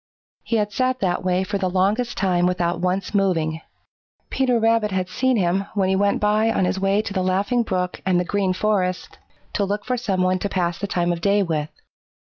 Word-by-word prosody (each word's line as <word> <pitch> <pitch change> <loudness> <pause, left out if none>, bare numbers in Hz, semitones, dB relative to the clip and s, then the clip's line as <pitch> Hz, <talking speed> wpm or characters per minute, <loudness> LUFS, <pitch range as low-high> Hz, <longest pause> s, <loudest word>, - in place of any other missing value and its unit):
He 230 - -2
had 210 -1 0
sat 255 0 0
that 180 -2 0
way 185 0 +1
for 200 +1 -3
the 185 -1 0
longest 205 +7 0
time 180 -2 +2
without 175 -1 -1
once 185 +3 -1
moving. 165 -5 0 0.7
Peter 250 -3 +1
Rabbit 225 -1 +2
had 185 -2 -1
seen 260 -1 +1
him 190 +1 +1
when 190 -2 +1
he 190 - +2
went 200 +1 +1
by 215 +2 +2
on 190 - +1
his 190 - -1
way 195 +2 +1
to 205 - -5
the 190 - 0
Laughing 195 +6 +1
Brook 185 -5 -2
and 185 -2 +2
the 180 - -1
Green 195 0 0
Forest 185 -2 -1 0.3
to 205 - 0
look 205 +1 -2
for 250 0 -1
some 195 -6 -1
one 185 0 +1
to 200 - -2
pass 175 -3 -1
the 200 - -3
time 175 -2 0
of 170 - -6
day 200 +2 +3
with. 155 -4 -2
195 Hz, 215 wpm, -22 LUFS, 180-210 Hz, 0.7 s, day